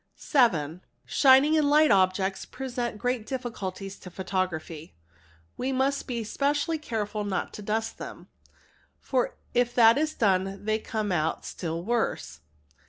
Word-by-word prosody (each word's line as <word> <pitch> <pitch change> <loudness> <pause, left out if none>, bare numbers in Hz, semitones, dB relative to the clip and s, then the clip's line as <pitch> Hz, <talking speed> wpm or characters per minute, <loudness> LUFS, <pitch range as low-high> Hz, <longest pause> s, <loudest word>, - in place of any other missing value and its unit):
| - - -48
7. 180 - +1 0.2
Shining 275 +3 +5
and 290 -2 +2
light 300 0 +5
objects 190 0 +2
present 245 -4 -4
great 245 +1 -1
difficulties 200 -7 -5
to 180 - -10
photography. 180 - -4 0.6
We 260 +2 -1
must 270 +2 0
be 235 -3 -2
specially 290 +7 0
careful 215 -6 -3
not 195 -3 -3
to - - -8
dust 220 +2 -2
them, - - -8 0.7
for - - -1 0.2
if 240 0 +1
that 230 +2 +6
is 310 0 -1
done 195 -1 0
they 215 0 +1
come 215 -2 -3
out 160 -2 -1
still 165 -1 -4
worse. 225 - -2
220 Hz, 140 wpm, -27 LUFS, 190-260 Hz, 0.7 s, that